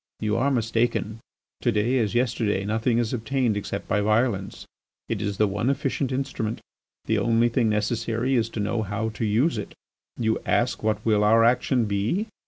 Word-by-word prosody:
You 105 0 0
are 130 +4 +2
mistaken. 115 -3 0 0.4
To 120 - +2
day 115 +5 +1
as 110 0 -1
yesterday 110 -5 0
nothing 115 +3 +1
is 120 -1 0
obtained 125 -1 0
except 100 0 -4
by 105 - +1
violence; 105 -2 0 0.4
it - - -2
is 100 -1 -2
the 105 - +4
one 105 +5 -1
efficient 135 -1 -1
instrument. 130 -4 -2 0.5
The - - +1
only 115 0 +3
thing 120 -1 +1
necessary 115 +3 0
is 115 -3 +1
to - - -1
know 105 +2 -1
how 110 +2 -2
to 110 +1 -5
use 115 +5 +2
it. - - -7 0.4
You 110 -2 0
ask 120 +1 0
what 110 -1 -1
will 105 -2 +3
our 115 +2 +5
action 125 +1 +2
be? 105 - 0
115 Hz, 180 wpm, -25 LUFS, 105-120 Hz, 0.5 s, our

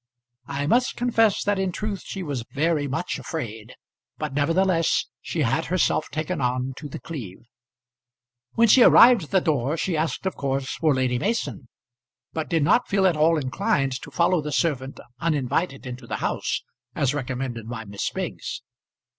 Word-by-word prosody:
I 140 0 -2
must 245 +11 +2
confess 225 -4 +2
that 205 -1 +1
in 190 -1 0
truth 205 +1 -4
she 195 - -6
was 140 -7 -3
very 150 0 +1
much 140 +6 -3
afraid, 115 - -6 0.4
but - - -4
nevertheless 165 +3 +2 0.2
she 160 - -2
had 135 +7 +1
herself 180 -3 +1
taken 155 +1 -3
on 125 +1 -1
to 150 - -7
The - - -7
Cleeve. 120 - -8 1.1
When 230 +1 +5
she 250 +4 +7
arrived 235 -5 +7
at - - -19
the 190 - +4
door, 150 -2 0
she 175 +1 -1
asked 155 +2 -2
of 190 - -1
course 135 -1 -2
for 155 -4 +2
Lady 130 -2 +1
Mason, 210 - -2 0.7
but 160 -1 -3
did 165 -3 +2
not 195 +11 +3
feel 195 -1 +2
at 180 -3 +4
all 160 +2 +4
inclined 135 0 0
to - - -9
follow 170 +3 +2
the 150 0 -5
servant 140 -3 -1 0.2
uninvited 150 -1 -1
into 125 -1 -7
the - - -3
house - - -2 0.3
as 140 -2 +1
recommended 125 -4 -4
by 115 -2 -5
Miss 100 0 -3
Biggs. - - -5
150 Hz, 170 wpm, -24 LUFS, 130-180 Hz, 1.1 s, she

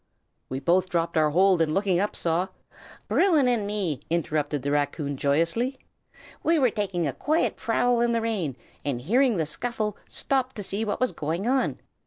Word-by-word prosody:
"We 130 - -3
both 180 +5 +2
dropped 170 -1 -1
our 155 -1 +4
hold, 185 +2 +4
and 155 -1 +1
looking 195 -3 +2
up, 205 +2 -1
saw 170 +2 0 0.3
" - - -19
"Bruin 320 -9 +3
and 230 -5 +1
me!" 195 - -1
interrupted 150 -4 -1
the 140 - -1
raccoon, 145 0 -1
joyously. 165 - 0 0.6
"We 330 0 +3
were 255 -6 +3
taking 190 -5 -1
a 140 - -1
quiet 310 - 0
prowl 240 +1 +1
in 240 0 +2
the 230 -1 +1
rain, 200 - -2 0.3
and 140 -4 -2
hearing 235 - +2
the 160 - +1
scuffle, 215 +5 -3
stopped 265 -1 -1
to 205 - -5
see 200 +3 -2
what 210 -2 -2
was 255 - +2
going 165 +5 -3
on. 260 +1 +1
190 Hz, 185 wpm, -26 LUFS, 155-235 Hz, 0.6 s, our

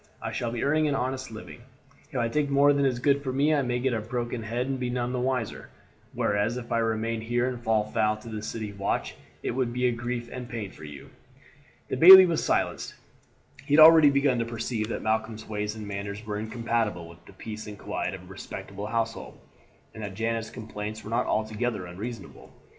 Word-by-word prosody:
I - - -4
shall 120 -1 -2
be 120 - -3
earning 155 +2 +2
an 145 - 0
honest 130 0 -2
living; 110 +2 -10 0.5
if 140 - -5
I 120 -1 +1
take 145 +4 0
more 140 +1 +5
than 140 -1 +2
is 125 -2 0
good 140 +3 +2
for 135 -2 -3
me 145 +4 +2
I 145 - +3
may 125 -2 -1
get 125 +1 0
a 110 - -1
broken 120 +1 -3
head 115 +3 -2
and 135 -1 -3
none 125 0 -2
be - - -4
the 125 - -1
wiser, 130 -4 -2 0.4
whereas 105 +4 0
if 120 -1 -8
I 115 - +2
remain 115 0 -1
here 120 +2 0
and 125 -2 -4
fall 110 -2 +2
foul 110 0 +1
of 115 +2 -10
the 105 -1 -4
city 110 -1 -5
watch 100 0 -2 0.3
it - - -1
would 125 -1 -1
be 125 0 +1
grief 120 0 -4
and 125 -1 -7
pain 110 -5 -5
for 75 - -12
you." 75 -2 -11 0.8
The - - -2
bailie 185 +5 +11
was 170 -3 0
silenced. - - -1 0.7
He 140 +1 +1
had 155 - +8
already 160 -1 +9
begun 140 -3 +2
to - - +1
perceive 115 -1 -3
that - - -4
Malcolm's 110 0 -2
ways 105 0 -3
and 110 -2 -7
manners 100 +1 -5
were 105 -1 -3
incompatible 110 -5 -2
with 85 +1 -15
the - - -14
peace 110 +2 -8
and 105 -1 -8
quiet - - -3
of - - -11
a - - -14
respectable 100 +1 -7
household, 115 0 -3 0.6
and 110 - -9
that 100 -2 -6
Janet's 115 +1 -2
complaints 110 -1 -7
were 110 - -8
not 115 - +1
altogether 110 -1 -1
unreasonable. 100 +5 -8
115 Hz, 215 wpm, -27 LUFS, 110-125 Hz, 0.8 s, bailie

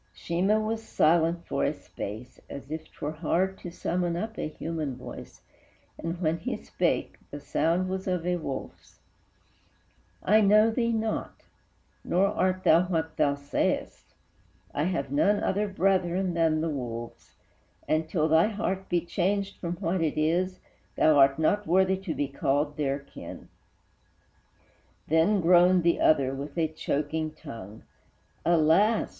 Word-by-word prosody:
Sheemah 190 +6 +1
was 220 +1 -2
silent 170 -3 +2
for - - -2
a - - 0
space, 110 +5 -8
as 140 +1 -9
if 160 0 -4
'T - - -24
were 145 - -2
hard 175 +4 -1
to 175 - -7
summon 175 0 -2
up 220 +5 -4
a - - -3
human 155 -3 -4
voice, 125 - -10 0.6
And, 165 +1 -4
when 165 -1 0
he - - -3
spake, - - -2
the 145 - -7
sound 165 +5 0
was 190 +1 -4
of 180 -2 -1
a 180 0 +1
wolf's: 140 -5 -7 1.2
"I 215 +2 +5
know 215 +2 +5
thee 235 0 0
not, 220 -1 -3 0.6
nor 185 +3 +2
art 185 -2 0
thou 170 +3 +5
what 160 -3 -2
thou 140 -1 +2
say'st; 140 0 -2 0.6
I 145 - 0
have 140 -7 -2
none 200 +9 +3
other 205 +2 0
brethren 190 -1 +1
than 165 -2 +2
the 165 - -1
wolves, 120 -4 -6 0.5
And, 155 0 0
till 155 -3 +1
thy 160 +4 +4
heart 195 -3 -3
be 175 -1 +2
changed 195 +2 -1
from 170 -1 -3
what 175 0 -1
it 155 -3 -1
is, 175 +4 0 0.3
Thou 155 -1 +4
art 135 0 +5
not 205 +6 +1
worthy 190 +2 +3
to 190 -4 -5
be 145 - -1
called 145 +2 -1
their 140 -2 -1
kin." 140 - -11 1.6
Then 165 +6 +3
groaned 180 +1 +5
the 170 0 +2
other, 135 -4 +3
with 140 +3 -7
a 165 -1 +2
choking 155 0 -2
tongue, 115 -9 -10 0.6
"Alas! 170 +7 +3
170 Hz, 150 wpm, -27 LUFS, 155-190 Hz, 1.6 s, I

